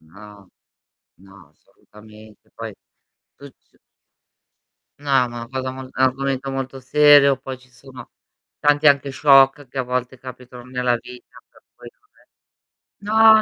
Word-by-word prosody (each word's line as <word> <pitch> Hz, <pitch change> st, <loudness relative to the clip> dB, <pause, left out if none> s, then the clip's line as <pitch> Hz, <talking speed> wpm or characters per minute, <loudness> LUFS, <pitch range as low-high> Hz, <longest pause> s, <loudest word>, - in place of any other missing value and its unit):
No, 100 Hz, +4 st, -16 dB, 0.7 s
no 95 Hz, -5 st, -18 dB
assolutamente 105 Hz, +6 st, -19 dB
poi, -, -, -7 dB, 0.6 s
tu 140 Hz, -, -12 dB
c -, -, -37 dB, 1.2 s
No, 145 Hz, -1 st, -9 dB
ma 130 Hz, -2 st, +3 dB
una 120 Hz, -1 st, -8 dB
cosa 130 Hz, 0 st, -4 dB
mol 130 Hz, 0 st, -9 dB
un -, -, -15 dB
argomento 135 Hz, +1 st, -1 dB
molto 135 Hz, 0 st, -5 dB
serio, 145 Hz, +1 st, +5 dB
poi 130 Hz, -1 st, -8 dB
ci 130 Hz, 0 st, -24 dB
sono 130 Hz, +1 st, -14 dB, 0.5 s
tanti 145 Hz, +1 st, +3 dB
anche 140 Hz, -1 st, +3 dB
shock 135 Hz, 0 st, +4 dB
che 130 Hz, -, -11 dB
a 130 Hz, -, +1 dB
volte 125 Hz, +1 st, -4 dB
capitano 125 Hz, -1 st, -12 dB
nella 125 Hz, -1 st, -1 dB
vita 125 Hz, +1 st, -13 dB
per -, -, -24 dB
cui -, -, -13 dB, 1.1 s
no 210 Hz, +2 st, -4 dB
è 220 Hz, -1 st, +7 dB
130 Hz, 140 wpm, -20 LUFS, 120-140 Hz, 1.2 s, è